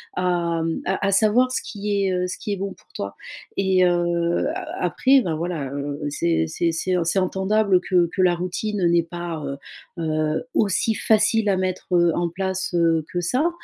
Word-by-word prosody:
à, 175 -2 0
hem, 165 0 -2
à - - -1
à 195 - +2
savoir 220 +6 +3
ce - - -1
qui 205 -1 -2
est, 190 - +1
heu, 180 0 0
ce 180 - -5
qui 205 - -4
est - - -1
bon 195 +1 -4
pour - - -25
toi 100 0 -5 0.4
et 190 -1 +3
heu, 175 +2 +1
a 375 - -4
après 270 +1 +4
ben, 165 -8 -2
voilà, 165 -3 -3
heu, 145 +1 -4
c'est 80 - 0
c'est 170 - 0
c'est 170 +3 -2
c'est 170 +4 +1
entendable 190 +1 +2
que 180 -2 +2
que 190 - +1
la 180 -1 +4
routine, 185 +4 -3
heu, 175 - +3
n'est 170 0 +4
pas, 170 -2 -6
heu 140 - -4 0.4
heu, 155 -1 -1
aussi 215 +2 +2
facile 220 0 +2
à 190 - +2
mettre, 185 -1 -2
heu, 175 -1 +4
en 175 0 0
place, 190 +1 -3
heu, 165 -2 +3
que 175 - -1
ça. 255 - +1
180 Hz, 200 wpm, -23 LUFS, 170-200 Hz, 0.4 s, après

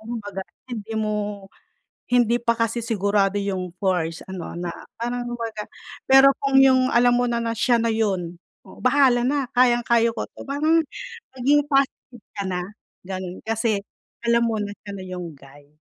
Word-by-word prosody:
kumbaga 215 -4 -6 0.3
hindi 225 -2 -6
mo, 210 -2 -2 0.6
hindi 240 -1 +3
pa 235 0 +2
kasi 230 +1 0
sigurado 205 -2 +1
yung 185 -3 -3
first 175 -4 0
ano 185 -2 -6
na, 175 0 -3 0.3
parang 245 +1 -2
kumbaga 230 -3 -4 0.5
pero 270 +1 +8
kung 275 -1 +4
yung 260 -1 +5
alam 240 +1 +5
mo 245 - +2
na 235 -1 -1
na 230 0 -1
siya 240 +1 +3
na 230 - +1
yun, 185 -6 -1 0.3
oo. - - -14
Bahala 255 -1 +4
na 285 +3 +1 0.2
kayang-kaya 240 -2 +3
ko 225 - -4
'to - - -12
parang 310 +4 +2 0.5
maging 285 +3 +3
positive 270 -4 -1
ka 200 - -2
na 180 -1 -2 0.4
ganon 185 -1 -6
kasi 220 -2 0 0.4
alam 235 0 +3
mo 225 -1 0
na 205 0 -4
siya 200 - -6
na 195 -1 -7
yung 180 -3 -6
guy. 145 +2 -18
225 Hz, 160 wpm, -23 LUFS, 195-245 Hz, 0.6 s, pero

